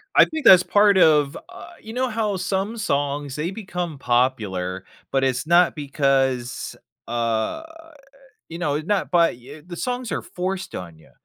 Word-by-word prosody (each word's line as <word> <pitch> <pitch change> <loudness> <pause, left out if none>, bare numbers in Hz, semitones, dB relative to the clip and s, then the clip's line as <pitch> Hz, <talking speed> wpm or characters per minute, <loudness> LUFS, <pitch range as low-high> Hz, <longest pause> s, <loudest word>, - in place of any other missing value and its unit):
I - - +8
think 315 -5 -6
that's 185 -4 +9
part 205 -1 +4
of 150 -4 +4
uh, 235 - -11
you 220 +1 -9
know 255 0 -1
how 215 -3 -1
some 195 +5 -2
songs, 145 -6 -2
they 160 +5 -3
become 180 -6 -5
popular, 105 -8 0 0.3
but 135 0 +1
it's 130 +1 0
not 175 +1 +4
because, 135 -4 -1 0.3
uh, 115 - -1 0.9
you 165 - -7
know, 150 -5 -1
it 155 +2 -4
not 205 -3 0
by, 170 -1 +4
eh, 135 +6 -13
the 175 - -8
songs 245 +2 -3
are - - -2
forced 185 +1 -5
on 85 -3 -8
ya, 80 - -21
155 Hz, 165 wpm, -22 LUFS, 130-195 Hz, 0.9 s, that's